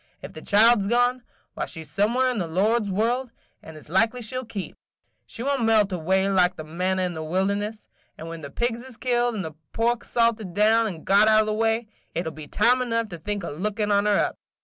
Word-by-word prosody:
Ef - - -8
the - - -9
child 220 +2 +5
's - - -3
gone, 245 +2 +2 0.3
why - - -3
she 160 -2 -8
's 150 - -16
somewhere 235 +8 +2
in 240 - -3
the 175 - -2
Lord's 205 +6 +1
world, 235 +6 0 0.3
and 160 -1 -11
it 150 - -14
's - - -21
likely 225 +8 +1
she 220 +4 -7
'll 255 - -2
keep, 200 -4 -6 0.3
– - - -48
she 230 - -7
won't 275 -2 0
melt 215 -3 +3
away 190 +2 +1
like 185 -2 +3
the 155 - -7
manna 185 +4 -1
in 180 -1 -2
the 160 - -6
wilderness; 200 +6 -2 0.3
and 160 - -8
when 165 0 -7
the 140 - -7
pigs 235 - -2
is 260 -3 -12
killed, 240 -2 0
and 195 -5 -3
the 160 - -7 0.2
pork 235 +1 0
salted 225 -6 0
down 220 +2 +4
and 170 -6 -7
got 200 +2 +5
out 215 0 +5
o' - - -5
the 215 - -1
way, 225 +1 0 0.3
it 170 - -2
'll 160 - -3
be 155 -1 -10
time 240 - +3
enough 230 -3 -1
to 170 -3 -8
think 205 +3 -4
o' - - -4
lookin' 210 +6 -2
on 205 +1 +3
her 205 - +3
up. - - -1
210 Hz, 245 wpm, -24 LUFS, 185-230 Hz, 0.3 s, child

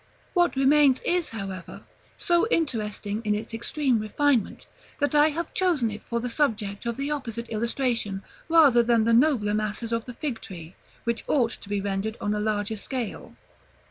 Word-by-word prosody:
What 350 -4 +3
remains 275 0 +5
is, 350 -2 0
however, 195 -4 -7 0.3
so 345 +4 +2
interesting 215 - -1
in 210 -1 +1
its 215 +2 -6
extreme 250 +1 0
refinement, 240 +2 0 0.3
that 285 +1 0
I 300 +1 +6
have 325 +2 -4
chosen 325 -12 +1
it 210 +1 -7
for 235 - -3
the 245 - -3
subject 225 -5 -1
of 235 - -2
the 280 +2 -2
opposite 235 -5 -4
illustration 230 -3 -1 0.3
rather 295 -8 +6
than 235 -1 +3
the 230 +1 +2
nobler 235 -5 +3
masses 215 +2 -2
of 230 -1 -1
the 245 - -8
fig 265 -4 -4
tree, 170 -3 -9 0.3
which 235 -1 -1
ought 240 -5 +2
to 200 - -9
be 205 -1 -1
rendered 200 +2 -2
on 205 - -1
a 210 - -1
larger 210 0 -1
scale. 245 +1 -5
235 Hz, 175 wpm, -26 LUFS, 210-285 Hz, 0.3 s, I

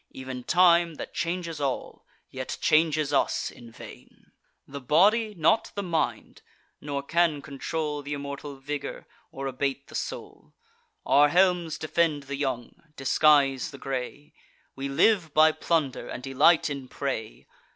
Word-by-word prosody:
Ev'n 130 -1 -7
time, 170 0 +4
that - - -8
changes 170 -3 -3
all, 135 -2 -4 0.2
yet 130 -1 -5
changes 155 -1 +2
us - - +1
in 120 - -13
vain: - - -14 0.4
The 140 0 -8
body, 210 - +3
not 175 +7 +2
the 200 - -3
mind; 165 -4 -2 0.4
nor 140 -1 -4
can 165 0 +1
control 150 +2 -4
Th' - - -15
immortal 140 0 -5
vigour, 145 +2 -6 0.3
or 135 - -6
abate 135 +1 -3
the - - -13
soul. - - -7 0.5
Our 145 +1 +5
helms 180 -2 +2
defend 155 -2 0
the 140 0 -5
young, 130 -4 -3 0.2
disguise 135 -1 +3
the 140 - -11
gray: 135 +2 -5 0.4
We 135 +1 -4
live 165 +2 +2
by 155 +1 +6
plunder, 155 -3 -1
and 125 - -7
delight 140 +5 +4
in 140 -3 -5
prey. 125 -6 -5
145 Hz, 140 wpm, -26 LUFS, 135-165 Hz, 0.5 s, by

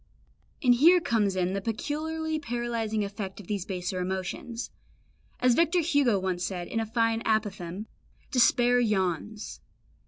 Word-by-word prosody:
And 250 -2 +6
here 330 +9 +6
comes 220 - +1
in 185 0 0
the 195 - -2
peculiarly 310 +8 -2
paralysing 235 -5 -2
effect 200 -1 -5
of 205 - -10
these 200 -1 -3
baser 185 -1 -3
emotions. 190 - -4 0.7
As 250 -1 +4
Victor 335 +5 +3
Hugo 285 - +3
once 185 -2 -2
said, 180 -2 -3
in 225 - -2
a 225 - -2
fine 230 0 +1
apophthegm, 205 -4 -1 0.5
"Despair 245 -1 +4
yawns." 210 -1 -1
225 Hz, 135 wpm, -28 LUFS, 190-245 Hz, 0.7 s, And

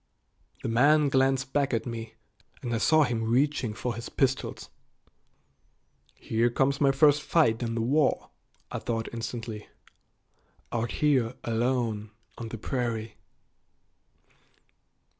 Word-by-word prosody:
The - - -2
man 145 +6 +4
glanced 135 0 +1
back 140 -3 +1
at 115 - -2
me, 115 -2 -6 0.5
and 120 -2 -2
I 115 - 0
saw 155 +5 +5
him 120 -4 -1
reaching 120 -1 +1
for 120 0 -3
his 115 +1 -7
pistols. 130 -1 -1 1.5
"Here 115 +2 0
comes 135 +4 +1
my 140 -1 +5
first 145 +1 +4
fight 120 -10 +2
in 115 -1 -2
the 115 - -1
war," 140 +5 +1 0.4
I - - -3
thought 115 -1 -3
instantly, 115 -2 -5 1.0
"out 115 0 -1 0.2
here 130 -5 +2
alone 115 -2 -1 0.3
on 115 - -5
the 115 - -6
prairie." 115 -2 -3
120 Hz, 120 wpm, -28 LUFS, 115-135 Hz, 1.5 s, saw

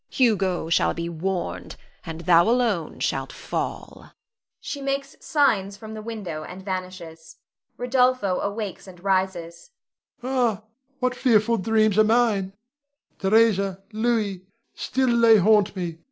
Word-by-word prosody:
Hugo 195 -9 +1
shall - - +2
be 170 0 -3
warned, 170 - -4 0.3
and 165 0 -7
thou 170 +3 +5
alone 230 -9 0
shalt - - -1
fall. - - -6 0.5
[She 285 - -6
makes 275 0 -3
signs 200 - +1
from 220 +2 -9
the 215 - -7
window 205 -9 -6
and 190 +4 -10
vanishes. 180 -4 -7 0.4
Rod. 245 +1 -6 0.3
[awakes 200 +1 -3
and 180 -1 -14
rises]. 185 - -1 0.5
Ah, 245 -5 0 0.4
what 255 0 0
fearful 230 -3 +2
dreams 215 0 +2
are - - +7
mine! 215 -4 +2 0.7
Theresa 195 -2 +2
Louis 215 -4 0 0.3
still 255 -3 0
they 225 -1 +7
haunt 205 0 +3
me! 170 -3 -5
200 Hz, 125 wpm, -24 LUFS, 185-230 Hz, 0.7 s, are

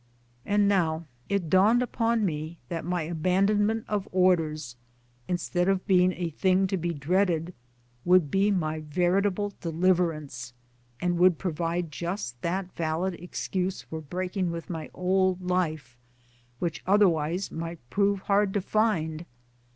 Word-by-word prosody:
And 205 0 +3
now 165 -5 +1 0.2
it 200 -4 0
dawned 205 +8 +4
upon 230 -2 0
m$ 155 0 -4
that 165 -1 -3
my 175 0 -1
abandonment 195 +7 +1
of 205 -2 -2
Orders, 160 -8 +1 0.5
instead 175 +1 0
of 195 -1 +1
being 185 -2 +4
a 170 -2 -3
thing 185 +4 +2
to - - +4
be 170 0 -2
dreaded, 170 +2 0 0.5
would 180 -5 +4
be 195 +2 +3
my 160 -5 0
veritable 185 +6 0
deliverance, 165 -7 0 0.5
and 175 +1 0
would 180 -2 +5
pro 185 - -2
vide 165 +1 -2
just 160 - -4
that 180 +3 -2
valid 165 +3 -1
excuse 180 +2 -3
for 160 0 -7
breaking 180 +4 -2
with 170 +2 -5
my 160 -2 -5
old 185 0 +1
life, 155 -9 -2 0.6
which 170 +4 -3
otherwise 180 -3 +2
might 165 +1 -5
prove 200 -1 +2
hard 200 0 +1
to 205 - +2
find. 175 -7 0
180 Hz, 135 wpm, -27 LUFS, 160-195 Hz, 0.6 s, would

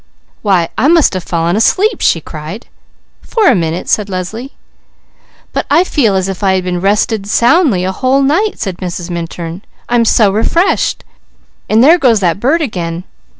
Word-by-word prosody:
"Why 185 -5 +1
I 275 - +3
must 330 -6 +4
have 185 -2 -4
fallen 170 +1 -1
asleep!" 390 - +1
she 165 - +2
cried. 155 +10 -8 0.6
"For 445 -3 -1
a - - +6
minute," 165 -3 -2
said 210 -2 0
Leslie. 205 +8 -5 1.0
"But - - -2
I 320 +5 +4
feel 245 - +1
as 190 0 0
if 195 -2 -5
I 195 -2 +2
had 180 -1 -3
rested 205 +1 0
soundly 240 - +2
a 190 - -1
whole 260 +7 +1
night," 340 +10 +1
said 190 -4 -5
Mrs. 180 -1 -5
Minturn. 170 +1 -6 0.3
"I'm 240 -1 +2
so 215 -3 +3
refreshed. 335 - 0 0.7
And 220 +2 +4
there 330 +6 +6
goes 235 -7 +3
that 175 -1 0
bird 305 +9 +1
again. 175 - -4
205 Hz, 165 wpm, -13 LUFS, 180-270 Hz, 1.0 s, a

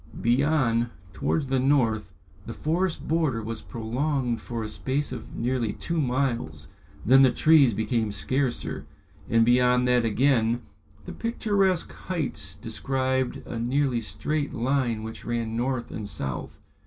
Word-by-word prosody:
Beyond, 120 -2 +2 0.2
towards 80 - 0
the 130 0 0
north, 115 -7 +2 0.4
the 115 - -5
forest 165 +6 -1
border 150 -9 +1
was 115 +1 -5
prolonged 120 +1 -2
for 115 -2 -4
a - - -3
space 135 +6 -2
of 120 -4 -7
nearly 120 -3 -1
two 170 -2 -2
miles, 120 - -1 0.4
then 135 +4 +7
the 130 - +7
trees 140 -2 +5
became 110 0 0
scarcer, 130 +5 -2 0.4
and 115 0 +4
beyond 125 +1 +4
that 125 -1 +3
again 115 0 +2 0.4
the - - -7
picturesque 200 -6 0
heights 170 -7 -3
described 130 -1 -1
a 115 - -5
nearly 125 0 +1
straight 145 +6 -3
line 120 -2 0
which 110 0 -7
ran 115 -1 -2
north 120 0 -2
and 105 -2 -5
south. 65 -1 -5
125 Hz, 135 wpm, -26 LUFS, 115-140 Hz, 0.4 s, then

